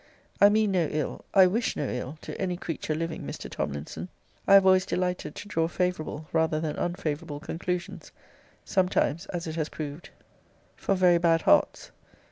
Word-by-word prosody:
I 200 - +9
mean 215 -1 +2
no 175 -4 +2
ill, 150 -1 -3
I 190 -2 +7
wish 220 +6 0
no 145 - -2
ill, 125 +5 -4
to - - -6
any 180 -2 -1
creature 160 -3 -3
living, 165 0 -3
Mr. - - -6
Tomlinson. 75 - -4 0.4
I 195 - +8
have 195 -1 +7
always 185 -1 +5
delighted 180 -5 -2
to - - -8
draw 165 -5 0
favourable 170 -3 -2
rather 160 -1 +2
than 155 -1 -2
unfavourable 160 -4 -3
conclusions; 175 +3 -4 0.5
sometimes, 180 -2 +1
as 175 -1 -4
it 160 0 -5
has 155 -2 -1
proved, 150 +2 -7 0.7
for 195 - 0
very 180 -2 +4
bad 165 -1 +3
hearts. - - +3
170 Hz, 165 wpm, -27 LUFS, 155-185 Hz, 0.7 s, I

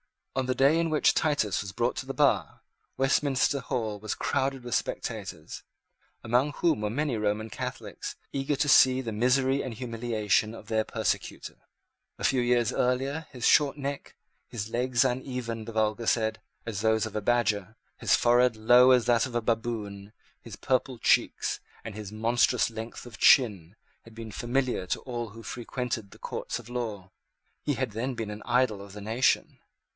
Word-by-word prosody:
On 130 -1 0
the 130 - 0
day 140 +6 +4
in 165 -1 +1
which 155 -1 +3
Titus 145 -10 +1
was 95 -1 -7
brought 120 +4 0
to 130 - -5
the 135 - -3
bar, 115 - +1 0.4
Westminster 135 +1 +2
Hall 115 -5 -3
was 110 0 -3
crowded 135 -2 -1
with 120 -2 -5
spectators, - - -4 0.6
among 125 +6 +1
whom 165 -10 +1
were 105 - -1
many 135 +1 -1
Roman 105 +1 -1
Catholics, - - -6 0.2
eager 135 +1 -1
to 145 - 0
see 130 -1 +6
the 115 -3 -4
misery 130 +5 +2
and 130 - -5
humiliation 115 -2 -1
of 110 - -12
their 110 -1 +1
persecutor. - - -3 0.6
A - - -9
few 130 - +3
years 120 -2 +2
earlier 135 +5 0
his 125 -4 -4
short 145 -1 +4
neck, 140 0 -5 0.3
his 110 -2 -5
legs 125 +1 +1
uneven, 125 -3 -3
the 115 - -7
vulgar 110 +1 0
said, 110 -2 +1 0.3
as 105 -4 -4
those 110 0 +2
of 110 - -8
a 105 - -1
badger, 110 -3 0 0.2
his - - +3
forehead 120 0 +4
low 120 +4 +6
as 125 -2 +4
that 120 +1 +3
of 120 - -9
a 120 - +1
baboon, 110 -3 -3 0.3
his 115 -4 -10
purple 130 +3 -1
cheeks, - - +1 0.2
and 115 - -7
his 105 -1 -7
monstrous 115 +2 +2
length 115 +2 -7
of 120 -3 -11
chin, 100 - +4 0.3
had 115 -1 -16
been 115 -1 -8
familiar 120 -4 -1
to - - -2
all 120 -4 -5
who 115 +2 -11
frequented 120 -2 -4
the - - -15
courts - - -4
of - - -11
law. 110 -6 -5 0.5
He - - 0
had - - -2
then 120 +5 -3
been 115 -2 -4
the 105 0 -7
idol 120 -4 +1
of 100 -1 -11
the 105 - -8
nation. 110 +5 +1
120 Hz, 175 wpm, -28 LUFS, 110-130 Hz, 0.6 s, see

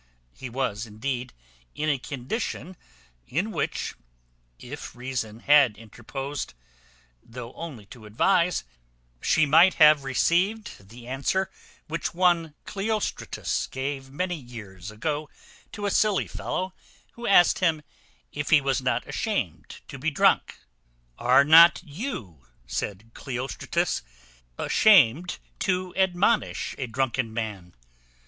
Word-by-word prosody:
He 130 - -8
was, 115 -3 -2
indeed, 125 +4 -4 0.4
in 155 - -2
a 140 -3 +1
condition, 150 - -4 0.5
in 180 - -1
which, - - -2 0.6
if 135 - -9
reason 120 -3 -4
had 140 -6 +5
interposed, 135 - -6 0.7
though 120 +1 -9
only 145 -11 -8
to 115 -4 -13
advise, 175 - +2 0.6
she 160 - +3
might 165 +6 +6
have 150 -2 +6
received 170 - 0
the 120 +1 -12
answer 140 +9 -1 0.4
which 165 +1 -3
one 170 -4 +2
Cleostratus 210 +1 -2
gave 135 0 -4
many 180 +6 -2
years 105 - -10
ago 145 +7 -3 0.4
to 205 - -5
a 200 - 0
silly 210 -2 +2
fellow, 185 0 -4 0.4
who 235 0 -7
asked 195 +2 +5
him, 165 -5 +1 0.5
if 150 -1 -4
he 155 - +7
was 135 0 0
not 125 -2 -1
ashamed 205 - -3
to 140 - -9
be 155 +5 0
drunk? 145 - +2 0.6
"Are 125 +3 +5
not 165 +4 +8
you," 135 - -7 0.2
said 105 - -5
Cleostratus, 130 0 -2 0.6
"ashamed 175 - +4 0.2
to 185 -1 -1
admonish 190 +4 +1
a 130 - -2
drunken 130 -1 -1
man?" 105 -6 -5
140 Hz, 115 wpm, -26 LUFS, 120-175 Hz, 0.7 s, not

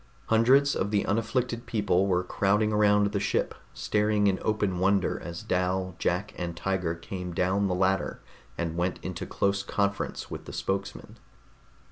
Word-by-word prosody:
Hundreds 130 +5 +5
of 100 - -1
the 105 -1 +1
unafflicted 115 +3 -1
people 100 -3 +1
were 90 -1 +2
crowding 105 +4 +1
around 105 -1 +4
the 100 - 0
ship, - - 0 0.2
staring 105 0 +1
in 95 -2 +2
open 105 -4 0
wonder 95 0 +2
as 85 +1 -7
Dal, 95 0 0
Jack 90 +4 -1
and 85 -1 -4
Tiger 95 -3 -1
came 90 +1 -6
down 95 +3 +1
the 90 - 0
ladder 95 +1 0 0.4
and 85 -1 -2
went 90 +1 -1
into - - -5
close 100 0 0
conference 100 0 -2
with - - -6
the - - -9
spokesman. 95 0 -4
100 Hz, 155 wpm, -28 LUFS, 90-105 Hz, 0.4 s, Hundreds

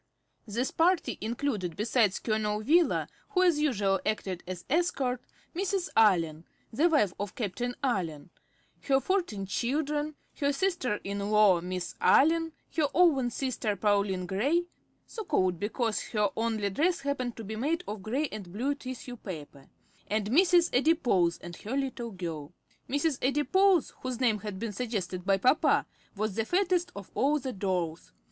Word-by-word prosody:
This 235 +5 -1
party 350 +2 +2
included, 215 - -2
besides 215 -2 +2
Colonel 215 -2 -1
Wheeler, 325 +8 +3 0.2
who 370 -3 +2
as 345 -5 +4
usual 205 -10 +1
acted 195 -4 -2
as 180 -1 -6
escort, 270 -6 0 0.3
Mrs. 375 0 -1
Allen, 170 -7 +3 0.3
the 310 +9 +3
wife 210 - +3
of 205 -1 -4
Captain 240 +3 -3
Allen, 175 - -2 0.5
her 270 -1 +4
fourteen 305 - -1
children, 295 +8 -1 0.2
her 280 -1 +2
sister 285 - 0
in 200 +1 -3
law 210 -5 +5
Miss 180 0 -4
Allen, 325 +3 +4 0.2
her 310 -3 +3
own 300 -8 +4
sister 240 -4 -2
Pauline 200 -2 +1
Gray, 275 - +1 0.4
so 445 - -7
called 185 - +1
because 220 +2 -1
her 210 -3 +1
only 220 -3 -1
dress 340 - +1
happened 265 -4 -2
to 225 - -6
be 220 +1 -5
made 310 +10 -1
of 210 -1 -5
gray 260 +9 -1
and 200 -5 -8
blue 250 +9 -1
tissue 255 -2 -8
paper, 150 -9 -9 0.4
and 210 0 -1
Mrs. 350 +3 +4
Adipose 250 - +3
and 175 0 -9
her 245 +6 -4
little 255 -4 -3
girl. 165 -6 -6 0.4
Mrs. 285 +1 0
Adipose, 335 +7 +3
whose 255 -2 -4
name 230 -5 +2
had 205 -2 -6
been 220 +1 -4
suggested 190 -5 -3
by 195 -1 +4
papa, 255 +10 +3 0.3
was 215 0 -1
the 225 +2 -1
fattest 360 - +1
of 200 - -9
all 290 +3 +2
the 260 -3 -4
dolls. 180 -4 -2
235 Hz, 155 wpm, -29 LUFS, 195-295 Hz, 0.5 s, law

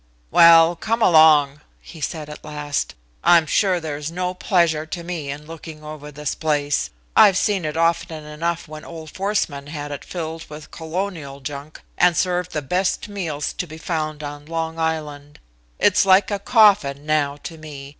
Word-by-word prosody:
"Well! 165 0 +7
Come 225 +6 -1
along," 150 -4 +5 0.2
he 160 - -13
said 155 0 -4
at 150 - -10
last. 150 - -3 0.3
"I'm 170 -2 +6
sure 185 +2 +2
there 155 -3 -5
is 150 +1 -5
no 180 +1 -3
pleasure 170 -4 +1
to 170 +1 -6
me 170 -5 -5
in 145 +2 -6
looking 160 -1 -10
over 150 -1 -9
this 150 0 -3
place. 145 -2 0 0.3
I've 190 -2 +7
seen 200 -4 0
it 155 +1 -3
often 165 -1 0
enough 165 +3 -3
when 155 0 -9
old 160 -2 -9
Forsman 190 -8 -2
had 145 -1 -6
it 145 - -6
filled 165 -2 -6
with 150 0 -10
colonial 160 -4 -5
junk, 140 +2 -8 0.2
and 175 -1 +4
served 180 -1 0
the 150 - -3
best 185 +8 -1
meals 165 -8 -3
to 180 - -4
be 155 0 -10
found 155 -2 -3
on 145 0 -8
Long 165 0 -3
Island. 150 -3 -3 0.4
It's 205 0 +4
like 190 +1 +4
a 200 - -1
coffin 195 - +4
now 145 -2 0
to 165 -2 -8
me. 145 -3 -9
160 Hz, 175 wpm, -21 LUFS, 150-175 Hz, 0.4 s, Well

